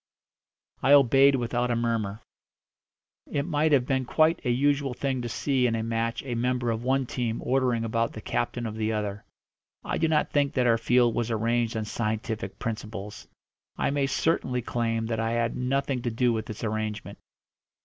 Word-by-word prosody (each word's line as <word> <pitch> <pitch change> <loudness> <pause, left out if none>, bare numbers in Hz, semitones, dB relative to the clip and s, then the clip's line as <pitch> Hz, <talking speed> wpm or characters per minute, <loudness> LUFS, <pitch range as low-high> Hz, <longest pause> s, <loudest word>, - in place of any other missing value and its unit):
I 140 - +5
obeyed 135 0 +6
without 120 0 -1
a 120 - +1
murmur. 115 -3 -1 1.1
It 140 - -1
might 155 -1 +1
have 135 -4 +4
been 130 0 0
quite 160 +5 +2
a 125 - -1
usual 135 +1 +1
thing 135 -1 -1
to 120 - -4
see 130 +3 +1
in 115 - 0
a 110 - -2
match 115 0 -2
a 130 -3 -4
member 120 0 0
of 110 0 -2
one 135 +1 +1
team 120 -2 -2
ordering 125 -3 +1
about 115 0 -1
the - - -7
captain 120 +1 -2
of 110 - -4
the 110 0 -1
other. 105 -1 -3 0.6
I - - -2
do 165 - +2
not 155 -1 +1
think 145 -1 +1
that 125 -2 +2
our 115 -1 +3
field 120 0 +3
was 120 0 -1
arranged 115 +1 0
on 110 - -2
scientific 110 -2 -3
principles; 110 -2 -6 0.5
I - - 0
may 140 -1 +1
certainly 130 -4 0
claim 115 -1 -1
that 110 0 -2
I 115 0 0
had 115 0 0
nothing 135 0 -1
to 120 - -1
do 120 +1 +1
with 110 -1 -4
its 110 - -7
arrangement. 110 -1 -3
120 Hz, 185 wpm, -27 LUFS, 115-130 Hz, 1.1 s, obeyed